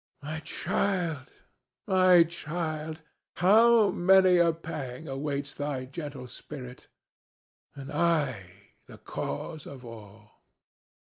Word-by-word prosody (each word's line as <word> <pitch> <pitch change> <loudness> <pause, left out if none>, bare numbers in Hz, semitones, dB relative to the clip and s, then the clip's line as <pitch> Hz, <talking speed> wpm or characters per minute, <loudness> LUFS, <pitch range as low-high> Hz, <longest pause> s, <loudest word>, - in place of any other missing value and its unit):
My 155 +2 -4
child, 165 -3 -2 0.5
my 185 -2 +6
child, 160 -1 -5 0.3
how 220 +3 +5
many 185 0 +5
a 170 -1 +4
pang 155 -3 -7
awaits 140 +1 -3
thy 145 -3 -3
gentle 140 -2 -7
spirit, 125 0 -10 0.9
and 140 +1 -8
I 130 - -1 0.2
the - - -12
cause 150 - -6
of 130 -3 -10
all!" 105 -2 -13
150 Hz, 95 wpm, -28 LUFS, 130-170 Hz, 0.9 s, my